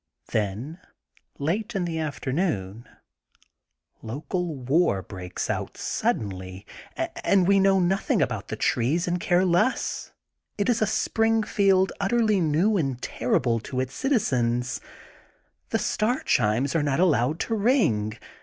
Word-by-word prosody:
Then, 110 - -2 0.6
late 200 +10 -2
in 185 -2 0
the 165 -2 -3
afternoon, 135 - -2 1.1
local 155 - -3
war 130 - +1
breaks 90 -2 -6
out - - -3
suddenly 95 -2 -3 0.6
and 190 -3 +3
we 200 0 +5
know 195 0 +4
nothing 185 +2 +1
about - - -1
the - - -4
trees, 150 +10 +1
and 175 0 0
care 175 +2 +2
less. 180 +8 0 0.5
It 205 +1 0
is 235 -2 +2
a 215 - +3
Spring 225 +1 +1
field 195 -2 +3
utterly 215 0 +2
new 170 +7 +2
and 135 -7 -1
terrible 120 -1 0
to 130 +3 -5
its 130 0 -2
citizens. 125 - 0 0.9
The - - +1
star 235 +5 0
chimes 120 +8 +1
are 165 - +3
not 145 0 0
allowed 155 -4 +2
to - - -2
ring. 200 - +2
160 Hz, 130 wpm, -25 LUFS, 120-195 Hz, 1.1 s, we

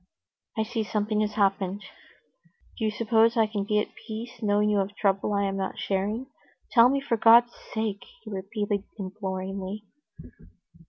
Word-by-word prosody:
"I 220 - +2
see 220 0 -2
something 210 0 0
has 210 0 -1
happened. 195 -1 0 0.9
Do 220 - -2
you - - +2
suppose 225 +2 +3
I 225 - +5
can 210 -2 -3
be 210 +1 +1
at 210 - -1
peace, 230 +2 -8
knowing 210 -1 +2
you 205 - +2
have 195 0 0
a - - -20
trouble 195 0 +1
I 200 0 +1
am 195 0 -1
not 195 - -3
sharing? 205 +6 -1 0.5
Tell 235 0 +7
me, 275 +1 +1
for 270 -4 -1
God's 235 +2 +6 0.2
sake," 220 -3 -2 0.2
he - - -9
repeated 200 +1 -2
imploringly. 195 0 -5
210 Hz, 165 wpm, -27 LUFS, 195-225 Hz, 0.9 s, Tell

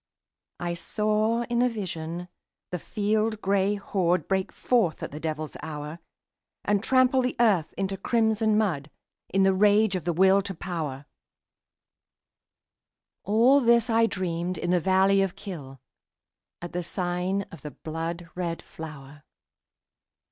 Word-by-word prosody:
I 175 -1 -2
saw 215 +6 0
in 235 0 0
a 250 - +4
vision 175 -5 -5 0.4
the 180 - -2
field 215 +4 0
gray 200 0 +1
horde 185 -3 0
Break 190 -1 0
forth 225 -11 +1
at - - -4
the 150 - -7
devil's 155 -1 -4
hour, 150 +1 -6 0.7
And 205 0 +1
trample 255 +1 +4
the 250 0 -1
earth 200 -9 +3
into 195 0 -2
crimson 220 0 +2
mud 165 -10 0 0.4
In 195 0 +2
the 190 0 +4
rage 205 +1 +4
of 175 -4 -3
the 175 - +1
Will 190 +3 +5
to 195 -1 -6
Power, 155 -6 -4 2.2
All 235 +7 +5
this 235 -1 +4
I 225 0 +4
dreamed 180 -2 -2
in 175 +2 -1
the 180 - +4
valley 190 +3 +4
of 195 -2 -1
Kyll, 140 -9 -8 0.8
At 175 - -6
the 180 - -1
sign 180 +2 -1
of 165 - -11
the 150 - -6
blood 165 +3 -5
red 170 -2 -3
flower. 145 -3 -10
190 Hz, 140 wpm, -26 LUFS, 165-215 Hz, 2.2 s, Will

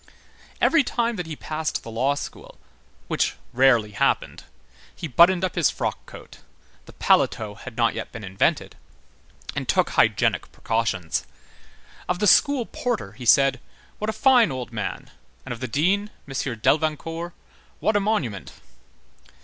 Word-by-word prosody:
Every 325 -3 +4
time 235 -2 -1
that 175 -3 -4
he 160 - -5
passed 155 +1 -3
the 115 - -8
law 130 +5 +1
school, - - -8 0.5
which - - 0 0.2
rarely 120 -4 +4
happened, 100 - -1 0.5
he 165 - -5
buttoned 175 +6 +5
up 185 - -3
his 170 -5 +3
frock - - -4
coat,—the - - -16
paletot 105 0 +1
had 130 -4 -10
not 115 -1 +2
yet - - -6
been 115 - -8
invented,—and 95 0 -4
took - - +2
hygienic - - +2
precautions. 110 -7 -2 0.8
Of 180 - +1
the 210 - 0
school 270 +4 +4
porter 235 - -3
he 120 +3 -9
said: 135 +3 +5 0.4
"What 215 - -2
a - - -1
fine 245 - +4
old 125 -2 -5
man!" 110 -3 -5 0.3
and - - -4
of 115 - -9
the 130 - -3
dean, 190 - +1 0.2
M. 135 - -8
Delvincourt: 155 +7 -1 0.5
"What 215 - +1
a - - +5
monument!" 155 - -2
145 Hz, 140 wpm, -24 LUFS, 115-195 Hz, 0.8 s, buttoned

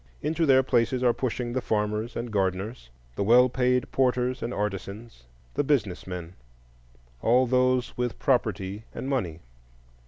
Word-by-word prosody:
Into 160 +1 0
their 130 -1 +6
places 125 0 +1
are 120 -1 +4
pushing 120 -1 -3
the 130 - 0
farmers 105 +1 -1
and 120 0 -4
gardeners, 95 - -2 0.3
the - - -1
well 125 +4 +6
paid 125 0 +1
porters 125 -1 +1
and 120 - -3
artisans, 105 - -5 0.3
the - - +1
business 120 -13 0
men,—all - - -3
those 130 0 +1
with 125 -2 -1
property 105 -6 0
and - - -5
money. 90 - -2
115 Hz, 135 wpm, -26 LUFS, 95-125 Hz, 0.3 s, their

